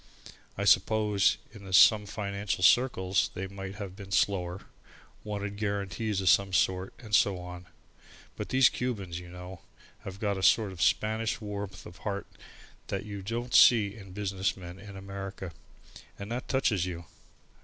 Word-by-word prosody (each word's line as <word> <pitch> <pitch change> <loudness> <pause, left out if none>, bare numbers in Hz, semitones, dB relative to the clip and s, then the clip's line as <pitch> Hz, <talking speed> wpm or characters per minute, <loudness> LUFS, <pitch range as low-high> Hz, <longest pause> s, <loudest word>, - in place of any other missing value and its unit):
I - - -1
suppose 105 -4 +3 0.2
in 100 -3 -10
some 105 +3 +7
financial 100 -2 -3
circles 95 -5 +3
they 95 - -3
might 95 0 -7
have 100 -3 -7
been 100 -1 -11
slower, 90 -2 +1 0.6
wanted 100 -1 -4
guarantees 100 0 -2
of 95 - +3
some 95 +1 +4
sort, 95 0 +1
and 110 -3 -12
so 100 -2 +4
on, 90 0 -9 0.7
but - - -6
these 130 0 +6
Cubans, 100 -9 -3
you 90 0 -11
know, 90 0 -9 0.4
have 95 0 -9
got 100 -3 -1
a - - -5
sort 105 +1 +4
of 90 -2 -8
Spanish 110 +4 +1
warmth 100 -3 -6
of 85 - -11
heart 100 -1 -4 0.6
that 100 +1 -3
you 100 -2 -6
don't 120 +5 -4
see 105 -5 +6
in 95 -4 -12
business 95 -1 -2
men 90 0 -9
in 100 -1 -10
America, 95 -1 -7 0.7
and 100 +2 -7
that 125 +2 -4
touches 110 -9 +1
you. 85 -1 -6
100 Hz, 155 wpm, -29 LUFS, 95-105 Hz, 0.7 s, some